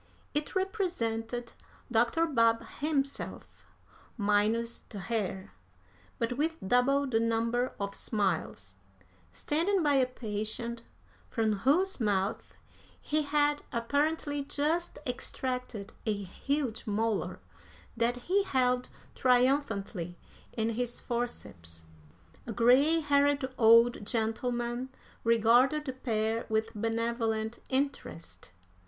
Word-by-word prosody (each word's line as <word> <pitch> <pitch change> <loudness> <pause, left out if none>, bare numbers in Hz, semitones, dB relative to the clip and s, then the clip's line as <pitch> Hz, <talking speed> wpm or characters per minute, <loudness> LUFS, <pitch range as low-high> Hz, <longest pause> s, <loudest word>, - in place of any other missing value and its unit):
It 295 +5 -2
represented 245 - -2 0.4
Dr. 240 +8 +3
Babb 230 -6 +3
himself, 280 -2 -3 0.5
minus 215 +3 +1
the 210 - -8
hair, 195 -2 -3 0.7
but 230 +1 -1
with 320 +2 +1
double 270 +5 +3
the 240 -4 +1
number 230 +2 0
of 200 0 -3
smiles, 165 - -2 0.5
standing 340 - 0
by 295 -1 +3
a 265 -2 +4
patient 230 0 -3 0.5
from 220 -2 +1
whose 350 - +2
mouth 200 -3 -1 0.4
he 305 +1 0
had 295 0 +2
apparently 290 +4 0
just 310 +5 -1
extracted 250 -4 -4
a 215 - +3
huge 255 +5 -2
molar 215 0 -1 0.6
that 235 +1 +1
he 390 +3 +3
held 250 -6 +1 0.2
triumphantly 245 - +1 0.4
in 225 0 0
his 240 +1 -3
forceps. 85 - -5 0.6
A - - -3
gray 260 +9 +4
haired 285 -2 +2
old 230 0 +6
gentleman 240 +3 -1 0.3
regarded 240 +6 +4
the 265 - -3
pair 225 -3 -1
with 220 0 0
benevolent 225 0 -1
interest. 275 - -3
240 Hz, 100 wpm, -30 LUFS, 220-280 Hz, 0.7 s, old